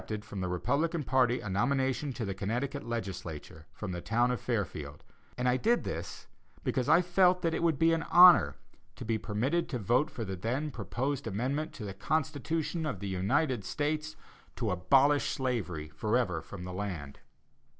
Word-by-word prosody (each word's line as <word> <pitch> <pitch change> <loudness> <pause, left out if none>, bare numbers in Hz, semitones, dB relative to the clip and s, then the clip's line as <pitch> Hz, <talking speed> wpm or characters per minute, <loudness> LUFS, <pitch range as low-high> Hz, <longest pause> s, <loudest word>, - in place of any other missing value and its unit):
_] 105 -1 -4
from 105 -3 -6
the 95 - -1
Republican 150 - 0
party 125 -2 +2
a - - -7
nomination 130 +7 0
to 120 -3 -4
the 100 - -2
Connecticut 120 +9 -3
legislature 90 -8 -6
from 105 -3 -6
the 90 -1 -4
town 120 +5 +1
of 125 - -3
Fairfield, 80 - -3 0.3
and 125 - 0
I 125 +1 +3
did 235 - +2
this - - -5 0.4
because 130 -4 0
I 175 - +6
felt 180 0 +3
that 165 -1 +1
it - - -1
would 165 -4 +2
be 165 +3 +4
an 165 - +1
honor 180 0 +8 0.4
to - - -8
be 110 -1 0
permitted 130 +13 -1
to 130 - -2
vote 125 - +2
for 115 -7 -5
the 95 -1 -4
then 125 +11 -2
proposed 130 +5 -3
amendment 130 +9 -2
to 110 - -7
the 100 - -5
Constitution 155 - -1
of 120 -11 -3
the 100 - -4
United 120 - 0
States 155 +6 -2 0.4
to 115 -5 -1
abolish 135 +11 +3
slavery 100 - -2
forever 90 +2 0
from 90 +3 -9
the 90 0 -6
land. 90 -8 -5
125 Hz, 180 wpm, -30 LUFS, 100-150 Hz, 0.4 s, honor